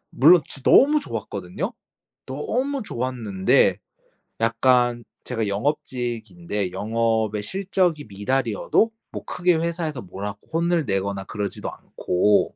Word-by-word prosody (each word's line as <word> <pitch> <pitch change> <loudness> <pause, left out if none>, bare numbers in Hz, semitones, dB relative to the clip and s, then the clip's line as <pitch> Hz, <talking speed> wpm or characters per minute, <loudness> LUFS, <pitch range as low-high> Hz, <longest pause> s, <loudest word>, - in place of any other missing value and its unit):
물론 160 +6 +6
진 135 - -9
너무 295 - +6
좋았거든요. 100 - -5 0.5
너무 255 - -2
좋았는데 120 - +1 0.7
약간 120 +1 +3 0.2
제가 110 -2 -2
영업직인데 105 - -2
영업의 110 +1 0
실적이 185 - 0
미달이어도 115 - +1 0.2
뭐 - - -6
크게 180 -1 +2
회사에서 160 -4 -2
뭐라고 100 +2 -6
혼을 170 -1 +1
내거나 95 -1 -1
그러지도 105 0 -4
않고 100 +3 +1
120 Hz, 275 characters per minute, -23 LUFS, 100-160 Hz, 0.7 s, 물론